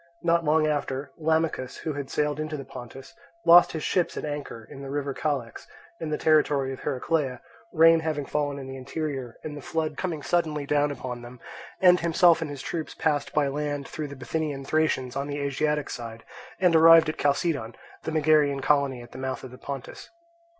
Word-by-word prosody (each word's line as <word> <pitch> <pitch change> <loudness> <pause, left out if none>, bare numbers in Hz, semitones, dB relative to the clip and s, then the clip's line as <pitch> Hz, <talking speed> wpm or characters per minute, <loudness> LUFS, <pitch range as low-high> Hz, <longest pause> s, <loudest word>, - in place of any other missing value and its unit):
Not 170 0 +3
long 155 0 +3
after, 140 -2 -2
Lamachus, 160 -4 0
who 155 - -2
had 140 -1 -5
sailed 150 0 -1
into 155 0 -3
the 135 - -7
Pontus, 130 +1 -10 0.3
lost 170 +1 +8
his 160 -2 -4
ships 180 -2 0
at - - -3
anchor 145 -6 -6
in 135 - -10
the 135 - -7
river 140 0 -2
Calex, 135 -6 -3 0.3
in 160 - -4
the 150 - -1
territory 145 -4 +2
of 130 - -9
Heraclea, 140 -2 -1 0.3
rain 165 0 +6
having 155 -3 -2
fallen 145 -1 -1
in 135 - -7
the 135 0 -7
interior 135 -2 -5
and 150 -1 -6
the 145 - -8
flood 155 0 -2
coming 165 -6 -3
suddenly 150 -1 0
down 145 +1 +2
upon 125 -3 -6
them; 120 +1 -11 0.4
and 180 -1 +7
himself 170 0 +4
and 160 - -3
his 140 -2 -7
troops 160 -2 -4
passed 150 -2 0
by 150 -2 +2
land 145 0 -3
through 155 -1 -5
the 140 - -9
Bithynian 140 +1 -3
Thracians 135 -4 0
on 140 +1 -2
the 145 0 -4
Asiatic 145 +1 -1
side, 115 -1 -7 0.4
and 180 -3 +4
arrived 165 0 +8
at 155 - -3
Chalcedon, 140 -5 0 0.3
the - - -4
Megarian 150 -2 +3
colony 140 -4 +1
at 120 - -15
the 130 - -9
mouth 130 -1 -4
of 130 - -8
the 125 - -12
Pontus. 135 -3 -7
145 Hz, 195 wpm, -26 LUFS, 135-155 Hz, 0.4 s, lost